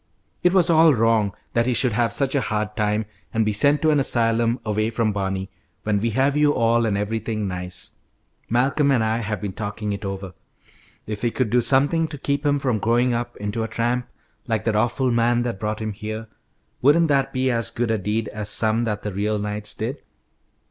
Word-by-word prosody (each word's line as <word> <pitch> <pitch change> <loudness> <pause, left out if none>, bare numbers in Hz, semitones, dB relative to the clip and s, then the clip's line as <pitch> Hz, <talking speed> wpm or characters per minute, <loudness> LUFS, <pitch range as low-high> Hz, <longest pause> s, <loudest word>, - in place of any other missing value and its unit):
It 180 - +4
was 180 -2 +4
all 160 -3 +5
wrong 115 -2 +2 0.2
that 115 +1 +2
he 125 - +1
should 125 0 +2
have 115 0 +1
such 135 +2 +1
a 140 - +2
hard 105 -2 -2
time 105 0 0 0.3
and 110 -1 +1
be 105 - 0
sent 140 +9 +3
to 155 - +4
an 150 - +3
asylum 115 -1 +2
away 110 +1 0
from 115 -1 0
Barney, 95 -1 -3 0.3
when 105 -1 +1
we 115 +3 0
have 135 +5 +1
you 150 0 +3
all 115 0 +2
and 100 -2 0
everything 110 0 -2
nice. 90 -1 -4 0.6
Malcolm 135 +5 +2
and 125 -5 +3
I 110 +1 0
have 105 -3 -3
been 100 0 -5
talking 105 0 -4
it 100 +1 -6
over. 95 -1 -5 0.7
If 105 -1 -5
we 120 - +1
could 115 -2 -1
do 125 0 +4
something 145 +7 +3
to 150 - -8
keep 140 +2 -1
him 145 -1 +2
from 125 -6 0
growing 120 +3 +2
up 120 0 -3
into 105 +2 -3
a 110 - -1
tramp 120 +2 -1 0.4
like 110 -2 -1
that 110 -2 0
awful 120 +4 +1
man 120 +1 +2
that 120 -5 -3
brought 105 +1 -3
him 110 -1 -3
here, 110 +2 -6 0.6
wouldn't 155 +5 +4
that 140 -2 +2
be 130 0 0
as 115 -1 0
good 115 0 -2
a 110 - 0
deed 105 +3 -1
as 105 -1 -4
some 110 +2 +2
that 105 -2 -3
the 105 - -3
real 105 +3 -1
knights 105 0 -3
did? 125 +6 -4
115 Hz, 210 wpm, -22 LUFS, 105-125 Hz, 0.7 s, all